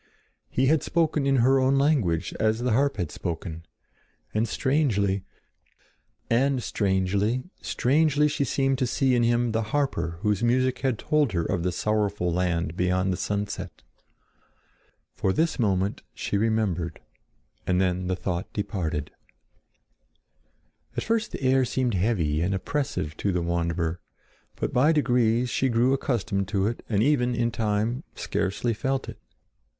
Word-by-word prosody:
He 130 Hz, -, +1 dB
had 155 Hz, +3 st, +3 dB
spoken 160 Hz, -4 st, +1 dB
in 135 Hz, -, +3 dB
her 135 Hz, +1 st, +5 dB
own 130 Hz, +1 st, +3 dB
language 135 Hz, -, +1 dB
as 110 Hz, +1 st, +1 dB
the 125 Hz, -, +1 dB
harp 140 Hz, +2 st, +2 dB
had 90 Hz, -6 st, -2 dB
spoken, 85 Hz, -1 st, -5 dB, 0.7 s
and 110 Hz, +2 st, +1 dB
strangely, 105 Hz, -8 st, +1 dB, 1.3 s
strangely 100 Hz, +1 st, 0 dB, 0.9 s
she 145 Hz, -1 st, -1 dB
seemed 135 Hz, 0 st, 0 dB
to 130 Hz, -, +1 dB
see 130 Hz, +1 st, +1 dB
in 120 Hz, -, +3 dB
him 120 Hz, 0 st, +2 dB
the 110 Hz, +1 st, 0 dB
harper 110 Hz, -, -1 dB
whose 105 Hz, -1 st, +1 dB
music 130 Hz, +2 st, +2 dB
had 130 Hz, -4 st, 0 dB
told 150 Hz, -5 st, +1 dB
her 85 Hz, -2 st, 0 dB
of 85 Hz, -, -1 dB
the 90 Hz, +1 st, 0 dB
sorrowful 100 Hz, -2 st, 0 dB
land 85 Hz, -2 st, 0 dB
beyond 90 Hz, +1 st, +1 dB
the -, -, -1 dB
sunset. 100 Hz, +2 st, -4 dB, 1.3 s
For 95 Hz, -, 0 dB
this 160 Hz, -, 0 dB
moment, 100 Hz, -3 st, 0 dB
she -, -, -3 dB
remembered, 100 Hz, -6 st, 0 dB, 0.7 s
and 90 Hz, 0 st, +2 dB
then 90 Hz, -1 st, 0 dB
the 95 Hz, -, 0 dB
thought 90 Hz, -1 st, -3 dB
departed. 80 Hz, -8 st, -3 dB, 1.9 s
At -, -, 0 dB
first 225 Hz, 0 st, 0 dB
the -, -, -6 dB
air 130 Hz, 0 st, +4 dB
seemed 125 Hz, -1 st, 0 dB
heavy 90 Hz, -6 st, +1 dB
and 95 Hz, +3 st, 0 dB
oppressive 95 Hz, -, -2 dB
to 100 Hz, -, 0 dB
the 90 Hz, -2 st, -1 dB
wanderer; 85 Hz, 0 st, -1 dB, 0.5 s
but -, -, -3 dB
by 145 Hz, +6 st, +4 dB
degrees 125 Hz, -4 st, +2 dB
she 135 Hz, -, +1 dB
grew 120 Hz, +3 st, +3 dB
accustomed 110 Hz, -8 st, -1 dB
to 100 Hz, -2 st, 0 dB
it 115 Hz, +3 st, -2 dB
and 105 Hz, -1 st, +2 dB
even, 125 Hz, -3 st, +2 dB
in 120 Hz, 0 st, 0 dB
time, 110 Hz, +4 st, -1 dB
scarcely 100 Hz, +5 st, -1 dB
felt 135 Hz, +4 st, -2 dB
it. -, -, -9 dB
110 Hz, 145 wpm, -26 LUFS, 90-130 Hz, 1.9 s, her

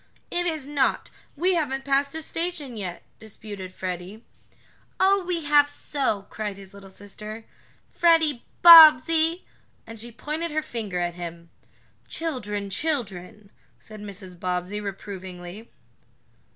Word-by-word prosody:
"It 350 Hz, 0 st, 0 dB
is 315 Hz, -5 st, -3 dB
not! 280 Hz, -2 st, 0 dB, 0.2 s
We 360 Hz, +5 st, +2 dB
haven't 270 Hz, -5 st, -1 dB
passed 280 Hz, +1 st, +1 dB
a 320 Hz, -, -4 dB
station 330 Hz, -7 st, -4 dB
yet," 180 Hz, -5 st, -6 dB, 0.2 s
disputed 205 Hz, -3 st, -9 dB
Freddie. 185 Hz, +4 st, -6 dB, 0.7 s
"Oh, 390 Hz, +1 st, +4 dB
we 345 Hz, -3 st, -1 dB
have 290 Hz, 0 st, +4 dB
so!" 270 Hz, -8 st, -2 dB
cried 210 Hz, -2 st, -5 dB
his 195 Hz, -1 st, -13 dB
little 200 Hz, -1 st, -13 dB
sister. 210 Hz, +3 st, -10 dB, 0.5 s
"Freddie 320 Hz, -6 st, +3 dB, 0.2 s
Bobbsey!" 325 Hz, +1 st, +8 dB, 0.4 s
and 225 Hz, -1 st, -10 dB
she 235 Hz, +2 st, -5 dB
pointed 305 Hz, +9 st, -4 dB
her 310 Hz, 0 st, -2 dB
finger 220 Hz, -10 st, -5 dB
at 175 Hz, 0 st, -1 dB
him. 170 Hz, -1 st, -9 dB, 0.6 s
"Children 210 Hz, -11 st, -4 dB
children," 205 Hz, -, -3 dB, 0.3 s
said 215 Hz, -1 st, -12 dB
Mrs. 190 Hz, -3 st, -10 dB
Bobbsey, 180 Hz, +3 st, -3 dB
reprovingly. 190 Hz, 0 st, -8 dB
220 Hz, 125 wpm, -25 LUFS, 195-305 Hz, 0.7 s, Bobbsey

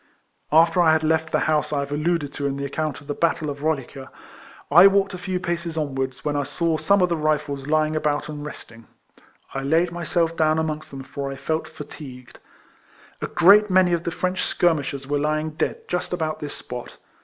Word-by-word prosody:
After 165 Hz, +3 st, +5 dB
I 160 Hz, -2 st, +5 dB
had 160 Hz, 0 st, +1 dB
left 160 Hz, 0 st, +1 dB
the -, -, +1 dB
house 155 Hz, -1 st, +1 dB
I 145 Hz, -2 st, 0 dB
have 140 Hz, 0 st, -5 dB
al 145 Hz, -, -1 dB
luded 155 Hz, -3 st, -1 dB
to 140 Hz, -, -2 dB
in 140 Hz, 0 st, -3 dB
the 140 Hz, -, -3 dB
account 155 Hz, +1 st, -3 dB
of -, -, -16 dB
the 145 Hz, -, -3 dB
battle 165 Hz, -1 st, 0 dB
of 140 Hz, 0 st, -8 dB
Roliga, 140 Hz, -3 st, -3 dB, 0.6 s
I 175 Hz, +6 st, +9 dB
walked 195 Hz, 0 st, +2 dB
a -, -, -5 dB
few 185 Hz, 0 st, -2 dB
paces 170 Hz, -2 st, -3 dB
onwards, 135 Hz, -3 st, -2 dB
Avhen 150 Hz, -1 st, -2 dB
I 145 Hz, -, +1 dB
saw 160 Hz, +3 st, -1 dB
some 200 Hz, -1 st, +3 dB
of 180 Hz, -, +2 dB
the 170 Hz, -, +1 dB
Rifles 150 Hz, -3 st, -1 dB
lying 155 Hz, 0 st, +1 dB
about 150 Hz, -1 st, 0 dB
and 150 Hz, -1 st, -6 dB
resting. 115 Hz, -6 st, -10 dB, 0.7 s
I 135 Hz, -, -3 dB
laid 165 Hz, +5 st, +2 dB
myself 170 Hz, -1 st, -1 dB
down 155 Hz, -1 st, +2 dB
amongst 155 Hz, -1 st, -3 dB
them, 135 Hz, -1 st, -8 dB
for 140 Hz, +1 st, -5 dB
I -, -, -5 dB
felt 160 Hz, +3 st, -2 dB
fatigued. 125 Hz, -5 st, -11 dB, 0.8 s
A -, -, -2 dB
great 200 Hz, +4 st, +6 dB
many 185 Hz, -1 st, +4 dB
of 170 Hz, -1 st, 0 dB
the -, -, -1 dB
French 180 Hz, +2 st, -2 dB
skirmishers 145 Hz, -5 st, 0 dB
were 145 Hz, +1 st, -1 dB
lying 155 Hz, +1 st, -1 dB
dead 155 Hz, -, -3 dB
just 180 Hz, 0 st, -2 dB
about 160 Hz, -3 st, -2 dB
this 145 Hz, -1 st, -6 dB
spot. 125 Hz, -1 st, -8 dB
155 Hz, 210 wpm, -23 LUFS, 145-170 Hz, 0.8 s, I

